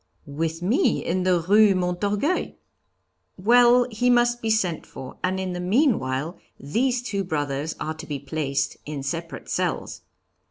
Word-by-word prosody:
'With 160 +3 -3
me 255 - +1
in 185 +1 -1
the 180 -2 +3
Rue 205 0 +6
Montorgueil.' 200 - -1 0.8
'Well, 240 +4 +5
he 245 +3 +1
must 240 0 +3
be 225 - -2
sent 190 -7 0
for; 130 -1 -10
and 185 +1 0
in 185 -1 -3
the 180 - -4
meanwhile, 180 - 0 0.2
these 240 - 0
two 200 -5 -2
brothers 145 -3 -2
are 155 +1 -3
to 155 - -10
be 145 - -3
placed 140 -1 -2
in 145 -2 -5
separate 165 +4 -5
cells.' - - -2
185 Hz, 150 wpm, -24 LUFS, 155-225 Hz, 0.8 s, Rue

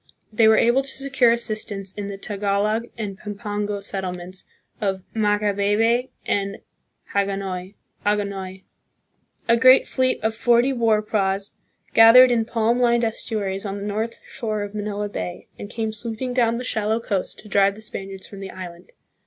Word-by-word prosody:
They 220 +1 +5
were 220 - +6
able 240 +3 +4
to 270 0 -5
secure 265 -3 +2
assistance 215 -4 -2
in 205 -1 -5
the 200 -1 -6
Tagalog 205 +2 -1
and 205 -3 -5
Pampango 205 -1 -4
settlements 185 -2 -5 0.4
of 190 -2 -1
Macabebe 210 +3 +2 0.2
and 200 0 -1 0.6
Hagonoy. 195 -1 -2 1.7
A 235 - +5
great 255 +2 +7
fleet 255 -1 +1
of 220 0 +1
forty 240 +3 +3
war 225 -3 +2
praus 195 -2 -1 0.4
gathered 240 +3 +9
in 230 -2 +2
palm 230 +1 +1
lined 235 -1 +3
estuaries 210 -3 -2
on 200 -1 -4
the 200 - -5
north 215 +3 -3
shore 215 -5 -3
of 205 0 -7
Manila 210 0 -3
Bay, 180 -3 -5
and 205 - -7
came 220 -1 -2
sweeping 230 +3 -4
down 235 -2 +2
the 250 - -4
shallow 220 -2 0
coast 200 -5 -2
to 215 - -12
drive 200 0 +3
the 215 - -12
Spaniards 195 -3 -7
from 200 - -11
the 195 -1 -6
island. 180 -1 -10
210 Hz, 155 wpm, -23 LUFS, 200-230 Hz, 1.7 s, gathered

